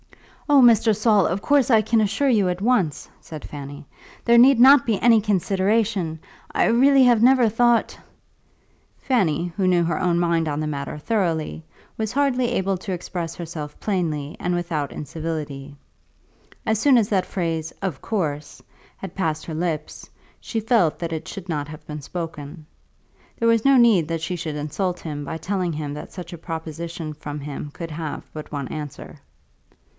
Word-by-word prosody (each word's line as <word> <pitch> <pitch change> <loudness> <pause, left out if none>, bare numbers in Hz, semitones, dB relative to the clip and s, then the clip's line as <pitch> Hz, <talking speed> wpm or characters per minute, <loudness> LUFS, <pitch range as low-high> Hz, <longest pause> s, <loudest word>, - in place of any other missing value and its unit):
"Oh, 285 -2 +6
Mr. 230 -2 +5
Saul, 210 -4 +3
of 185 +4 -2
course 285 -1 +3
I 225 -3 +5
can 220 +1 +2
assure 210 +7 0
you 210 -8 +3
at 180 0 -2
once," 195 - 0
said 155 -2 -9
Fanny. 145 0 -9 0.4
"There 235 0 +5
need 255 0 +6
not 270 +1 +7
be 220 -5 0
any 230 -2 +5
consideration. 195 -3 0 0.3
I - - +2
really 270 +3 +5
have 240 -3 +4
never 255 -1 +5
thought 235 +2 +2 0.5
" - - -39
Fanny, 175 - +1
who 190 -1 +1
knew 175 -1 +3
her 165 -2 -1
own 175 -2 +1
mind 170 -2 +1
on 145 0 -2
the 155 - -2
matter 140 0 -4
thoroughly, 165 -4 -1 0.3
was 220 -1 -2
hardly 260 -2 +1
able 195 -5 0
to 190 - -6
express 170 -2 -4
herself 160 -3 -7
plainly 160 -7 -2
and 180 0 -1
without 165 -5 -2
incivility. 150 -2 -6 0.9
As 220 -1 +1
soon 270 +1 +5
as 220 -4 +3
that 190 -3 +1
phrase 165 -3 -3
"of 185 -9 -3
course" 150 -9 -3 0.4
had 195 -2 -8
passed 160 -5 -2
her 165 - -6
lips, 155 -2 -4 0.3
she 225 - -3
felt 220 -8 +2
that 170 -1 -3
it 160 - -5
should 190 -2 -8
not 150 -4 -3
have 155 0 -11
been 150 -1 -7
spoken. 160 -1 -7 0.7
There 230 - +1
was 230 -1 +3
no 275 -1 +5
need 220 -10 +5
that 165 -1 -2
she 180 +3 -3
should 155 -3 -5
insult 155 +5 -3
him 145 -3 -5
by 160 +3 -5
telling 180 +1 -2
him 150 -1 -4
that 150 - -8
such 180 -1 -8
a - - -7
proposition 165 -1 -6
from 150 0 -7
him 145 0 -6
could 165 +1 -7
have 155 -1 -5
but 155 -1 -8
one 140 -3 -4
answer. 150 -3 -8
175 Hz, 175 wpm, -23 LUFS, 155-220 Hz, 0.9 s, not